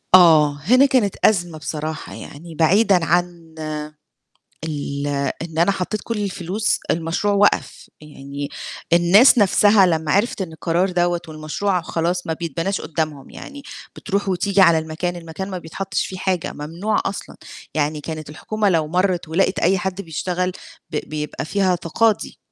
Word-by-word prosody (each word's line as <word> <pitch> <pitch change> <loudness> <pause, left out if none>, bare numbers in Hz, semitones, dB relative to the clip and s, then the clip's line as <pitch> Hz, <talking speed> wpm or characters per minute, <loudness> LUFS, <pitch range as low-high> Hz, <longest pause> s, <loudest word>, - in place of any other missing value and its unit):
آه، 155 -5 +6
هنا 255 - +5
كانت 245 -8 +2
أزمة 175 -6 +2
بصراحة 155 0 -5
يعني، 165 +2 -10
بعيدًا 180 +2 +3
عن 170 -1 -1 1.1
ال 145 -2 -3 0.3
إن 165 -1 -7
أنا 170 +4 +4
حطيت 195 +2 -3
كلّ 230 -2 -3
الفلوس، 195 +3 -1
المشروع 165 +5 0
وقف، 205 +1 +1
يعني 140 -1 -7 0.4
الناس 195 +10 +6
نفْسها 205 0 +5
لمّا 160 -3 0
عرفِت 200 +2 +1
إن 165 -4 -5
القرار 170 +4 0
دوّة 175 -1 +1
والمشروع 160 +5 -2
خلاص 170 +2 -2
ما 160 - 0
بيتبناش 170 +4 -3
قدّامهم، 155 -3 -4
يعني 280 0 -10 0.3
بتروح 200 -1 -2
وتيجي 195 +2 +2
على 170 -3 +6
المكان، 160 +3 -4
المكان 175 +3 -6
ما 185 - -4
بيتحطش 185 +3 -3
فيه 185 - -7
حاجة، 185 -2 -1
ممنوع 170 +9 -2
أصلًا، 195 - -5 0.4
يعني 150 0 -1
كانت 155 -1 -6
الحكومة 210 +7 -1
لو 160 -4 +1
مرِّت 180 0 0
ولقِت 190 +4 +1
أي 190 +3 +3
حد 190 +1 -3
بيشتغل 180 +2 -2 0.4
ب - - -5
بيبقى 150 -1 -4
فيها 190 +1 +1
تقاضي. 205 +6 0
175 Hz, 145 wpm, -21 LUFS, 160-195 Hz, 1.1 s, آه